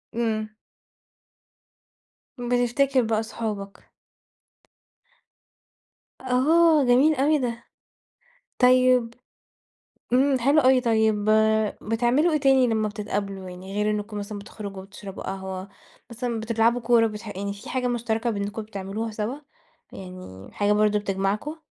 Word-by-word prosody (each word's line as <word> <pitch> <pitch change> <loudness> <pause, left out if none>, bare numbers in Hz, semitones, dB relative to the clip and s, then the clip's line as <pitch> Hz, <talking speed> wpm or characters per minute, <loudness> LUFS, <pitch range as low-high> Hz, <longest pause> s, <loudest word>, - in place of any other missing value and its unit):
إمم. 220 -2 -1 1.9
بتفتكر 245 +2 +1
بقى 220 -2 0
صحابك. 210 -3 -6 2.3
آه، 300 +5 +4
جميل 260 +5 +4
أوي 295 +3 +3
ده. 235 -3 -3 1.0
طيب. 250 -2 +4 1.0
إمم، 265 +1 +3
حلو 280 +5 +4
أوي. 260 0 +4
طيب 220 -3 +1 0.6
بتعملوا 240 +9 +1
إيه 305 - +2
تاني 270 -2 +4
لما 220 -2 0
بتتقابلوا، 200 -2 -4
يعني 185 +2 -9
غير 210 +1 0
إنكم 210 0 -4
مثلًا 205 0 -5
بتخرُجوا 200 -1 -8
وتشرَبوا 195 0 -10
قهوة، 190 0 -6 0.4
مثلًا 235 0 -3
بتلعبوا 230 +2 +1
كورة، 230 -1 +4
بتح 215 +1 -8
يعني 200 +1 -3
فيه 200 +2 -11
حاجة 255 -1 -1
مشترَكة 235 -1 -1
بأنكم 205 0 -3
بتعملوها 210 +1 -5
سوا، 215 +4 -3 0.6
يعني 180 - -10
حاجة 205 0 0
برضه 210 0 +2
بتجمَعكم؟ 200 +9 -2
225 Hz, 110 wpm, -24 LUFS, 205-250 Hz, 2.3 s, آه